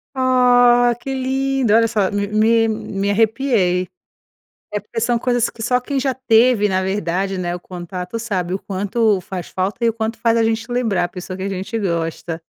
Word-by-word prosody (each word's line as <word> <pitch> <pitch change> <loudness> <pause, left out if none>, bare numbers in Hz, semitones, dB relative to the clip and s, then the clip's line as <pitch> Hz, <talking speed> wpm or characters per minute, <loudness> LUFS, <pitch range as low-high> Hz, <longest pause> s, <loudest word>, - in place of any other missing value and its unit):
Ah, 245 -2 +4
que 270 +2 -5
lindo, 265 -2 0
olha 230 +1 +5
só, 210 -4 0
me 205 0 -1
me 225 +2 +3
me 200 -2 -2
arrepiei. 215 -5 +1 0.9
É 210 - -1
porque 210 +3 -6
são 235 +1 +1
coisas 245 -1 +1
que 225 - -10
só 250 +2 +1
quem 275 +2 -3
já 265 -1 0
teve 235 -3 +3
na 190 -1 0
verdade, 190 0 -2
né, 175 -1 -2
o 180 - -6
contato 180 +3 -6
sabe 190 -6 -2
o - - -1
quanto 205 +2 0
faz 180 -1 -7
falta 190 +5 -2
e - - +4
o - - +1
quanto 225 0 -3
faz 230 -1 +2
a 230 - +3
gente 225 +1 -1
lembrar 225 -7 0
a - - -2
pessoa 180 +1 -7
que 190 - -7
a - - -2
gente 195 +3 -4
gosta. 165 -3 -3
220 Hz, 195 wpm, -19 LUFS, 190-240 Hz, 0.9 s, olha